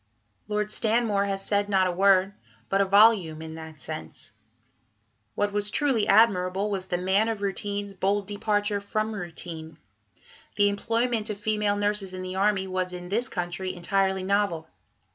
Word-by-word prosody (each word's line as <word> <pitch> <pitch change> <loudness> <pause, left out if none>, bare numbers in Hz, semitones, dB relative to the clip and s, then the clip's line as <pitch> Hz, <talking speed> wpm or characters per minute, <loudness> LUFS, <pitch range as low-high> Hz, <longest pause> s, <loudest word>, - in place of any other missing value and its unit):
" 105 - -44
Lord 210 0 -1
Stanmore 220 -3 +1
has 195 -1 -3
said 205 0 +1
not 190 -2 +3
a 180 - +1
word, 195 +1 +3 0.4
but 195 0 +2
a - - +3
volume, 195 -5 +4
in 160 0 -7
that 160 -1 -10
sense; 155 -7 -7 1.0
what 205 0 0
was 205 0 0
truly 250 -3 +1
admirable 200 -2 +3
was 190 -2 -3
"the 175 - -1
man 190 +5 +1
of 215 -3 -3
routine's" 200 +1 -3
bold 195 +2 0
departure 205 0 -1
from 215 +2 -2
routine. 165 -4 -7 0.8
The 205 -1 +4
employment 230 +2 -1
of 205 -1 -4
female 210 -1 0
nurses 205 -2 0
in 185 - -6
the 185 0 -5
army 195 0 +1
was 185 -1 -3
in 180 0 -7
this 235 +6 0
country 180 0 -4
entirely 190 +1 0
novel. 195 -4 0
200 Hz, 160 wpm, -26 LUFS, 185-210 Hz, 1.0 s, volume